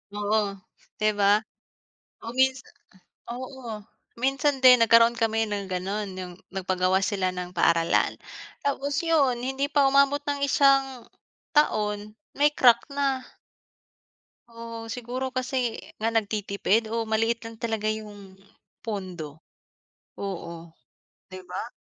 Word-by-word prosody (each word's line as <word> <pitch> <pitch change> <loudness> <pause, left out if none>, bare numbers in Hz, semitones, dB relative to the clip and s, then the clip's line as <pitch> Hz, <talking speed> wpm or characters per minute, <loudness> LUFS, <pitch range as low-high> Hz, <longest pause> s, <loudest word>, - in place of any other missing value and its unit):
Oo, 205 -1 0 0.4
di 215 0 +2
ba? 200 +1 +5 0.9
Oo, 230 - -7
minsa 260 0 +2 0.7
oo. 250 -5 -8 0.3
Minsan 270 +2 0
din 250 -2 +9
nagkaroon 230 +1 +6
kami 225 -1 +1
ng 205 -2 -4
gano’n. 195 +3 -3
Yung 180 -1 -6 0.2
nagpagawa 185 0 0
sila 190 -1 0
ng 180 0 -6
paaralan. 170 -1 +2 0.5
Tapos 280 0 -1
yun, 285 -7 +3
hindi 270 +2 -1
pa 285 -2 +3
umabot 280 +1 +3
ng 285 -1 -2
isang 270 -2 +3 0.5
taon 210 -6 +1 0.2
may 290 +1 +4
crack 250 -5 +5
na. 280 -2 0 1.3
Oo, 230 -1 -8
siguro 245 +3 -4
kasi 255 +1 -2 0.4
nga 220 - 0
nagtitipid. 215 -1 0
O 230 +1 -1
maliit 225 +1 0
lang 225 -1 -9
talaga 220 -2 -1
yung 205 -3 -9 0.4
pondo. 180 -8 -6 0.8
Oo. 170 -4 -6 0.6
Di 185 0 -8
ba? 185 +6 -6
225 Hz, 115 wpm, -26 LUFS, 200-260 Hz, 1.3 s, din